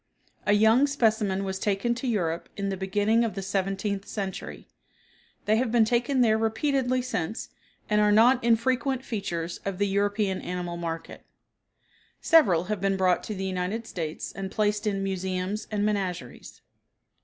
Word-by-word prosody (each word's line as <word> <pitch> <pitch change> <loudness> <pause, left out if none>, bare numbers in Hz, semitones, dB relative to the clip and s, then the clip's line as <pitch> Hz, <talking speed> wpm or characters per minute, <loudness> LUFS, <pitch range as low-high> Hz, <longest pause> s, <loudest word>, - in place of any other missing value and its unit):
A 205 - +5
young 220 +6 +5
specimen 215 -8 +1
was 190 -1 -3
taken 205 +4 0
to 250 +2 -4
Europe 170 -8 -1
in 200 -1 -2
the 195 - -2
beginning 205 +4 +1
of 230 - -2
the 195 - -4
seventeenth 195 +1 -2
century. 195 -3 -5 0.8
They 215 +1 +3
have 240 -1 0
been 230 -2 +4
taken 245 +3 +1
there 220 -2 +4
repeatedly 255 +3 0
since 225 -5 -3 0.4
and 210 0 +2
are 210 0 +4
not 240 +4 +5
infrequent 255 +3 +1
features 175 -6 -4
of 195 -2 -3
the 205 - +2
European 200 0 0
animal 175 -1 -4
market. 165 -1 -6 1.0
Several 200 - +4
have 200 0 -3
been 195 -1 +1
brought 185 -1 +2
to 215 - -4
the 190 0 -3
United 190 +4 -2
States 160 -7 -5
and 195 -1 -5
placed 210 +1 0
in 195 -1 -1
museums 190 +1 -3
and 210 -1 0
menageries. 185 - -4
205 Hz, 155 wpm, -27 LUFS, 190-225 Hz, 1.0 s, A